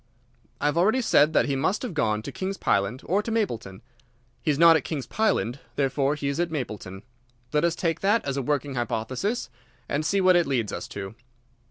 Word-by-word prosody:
"I - - -3
have 150 +3 +2
already 220 +9 +3
said 155 -9 +4
that - - +4
he 140 - -1
must 175 - 0
have 245 - -4
gone 110 -7 0
to - - -6
King's 195 +1 -4
Pyland 100 +6 0
or 195 +4 +1
to 220 - -6
Mapleton. 120 - -2 0.6
He - - -2
is 145 - +2
not 165 +1 +7
at 155 - +1
King's 145 -6 -4
Pyland. 135 - 0 0.2
Therefore 140 +1 +1
he 145 -2 -4
is 140 +3 -2
at 175 0 +1
Mapleton. 105 - -5 0.5
Let 150 +1 +2
us 170 -1 +2
take 165 -2 -1
that 205 +4 +2
as 140 -1 -2
a 140 - -1
working 145 0 -1
hypothesis 125 - -2 0.4
and 145 +2 -1
see 195 +5 +1
what 185 -1 +5
it 175 -3 +3
leads 120 -7 -1
us - - -5
to. 100 0 -7
145 Hz, 210 wpm, -26 LUFS, 125-180 Hz, 0.6 s, not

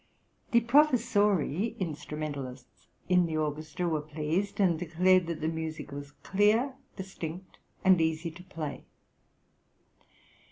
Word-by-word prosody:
The 235 - +4
professori 225 - +3
(instrumentalists) 150 -6 -6 0.2
in 180 -1 +4
the 160 -1 -2
orchestra 155 +3 -2
were 155 -3 0
pleased, 155 +7 -2
and 175 -5 +3
declared 180 +1 +3
that 165 -2 -4
the 155 - 0
music 160 -2 -4
was 140 0 -8
clear, 215 +7 +3 0.2
distinct, 185 -2 -7 0.3
and 185 -3 +6
easy 160 +1 0
to 170 +3 -12
play. 155 -6 -6
170 Hz, 115 wpm, -29 LUFS, 155-190 Hz, 0.3 s, and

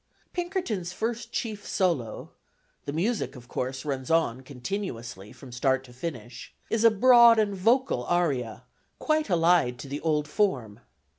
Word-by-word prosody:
Pinkerton's 345 - -3
first 230 +4 -3
chief 215 -3 -4
solo 160 - -1 0.5
the - - -3
music, 195 +5 -1
of 125 -1 -12
course, 130 +2 -4
runs 135 -3 -3
on 160 -7 +1
continuously 125 - -6
from 135 -3 -13
start 130 +2 +1
to 125 -2 -15
finish 125 -4 -7 0.2
is 225 0 +1
a 230 - +8
broad 235 +1 +7
and 210 -2 +2
vocal 225 - +1
aria, 135 -10 -1 0.3
quite 310 -4 0
allied 165 -7 +3
to 135 - -9
the 140 +2 -5
old 150 -2 0
form. 130 - -1
160 Hz, 145 wpm, -27 LUFS, 125-210 Hz, 0.5 s, a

